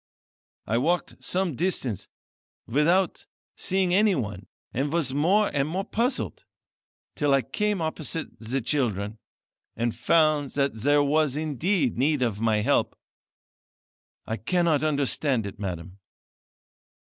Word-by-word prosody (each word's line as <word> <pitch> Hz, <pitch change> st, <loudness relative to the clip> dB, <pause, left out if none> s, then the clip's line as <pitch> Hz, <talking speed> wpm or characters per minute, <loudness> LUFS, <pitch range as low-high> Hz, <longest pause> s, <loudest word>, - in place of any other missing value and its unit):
I 115 Hz, +3 st, +1 dB
walked 170 Hz, +7 st, -1 dB
some 180 Hz, -5 st, -1 dB
distance 135 Hz, -, -1 dB, 0.6 s
without 170 Hz, +9 st, +1 dB, 0.3 s
seeing 185 Hz, -1 st, 0 dB
anyone, 130 Hz, -, +1 dB, 0.3 s
and 140 Hz, +4 st, -1 dB
was 155 Hz, -6 st, +1 dB
more 190 Hz, +9 st, +3 dB
and 140 Hz, 0 st, +1 dB
more 185 Hz, +5 st, -2 dB
puzzled, 245 Hz, +4 st, -1 dB, 0.7 s
till 145 Hz, -2 st, +2 dB
I 135 Hz, -, +2 dB
came 210 Hz, -3 st, -1 dB
opposite 160 Hz, -3 st, -4 dB
the 120 Hz, +5 st, -2 dB
children, 110 Hz, -5 st, -1 dB, 0.6 s
and 120 Hz, 0 st, -1 dB
found 150 Hz, +1 st, +2 dB
that 140 Hz, -1 st, +1 dB
there 145 Hz, +6 st, +3 dB
was 150 Hz, -1 st, +2 dB
indeed 155 Hz, -, 0 dB
need 145 Hz, 0 st, +2 dB
of 110 Hz, -3 st, -1 dB
my 110 Hz, -2 st, +2 dB
help. 140 Hz, +7 st, +1 dB, 1.3 s
I 110 Hz, -, -3 dB
cannot 170 Hz, +2 st, +1 dB
understand 140 Hz, -5 st, +1 dB
it, 100 Hz, -1 st, -7 dB
madam." 90 Hz, -1 st, -5 dB
145 Hz, 120 wpm, -26 LUFS, 120-170 Hz, 1.3 s, more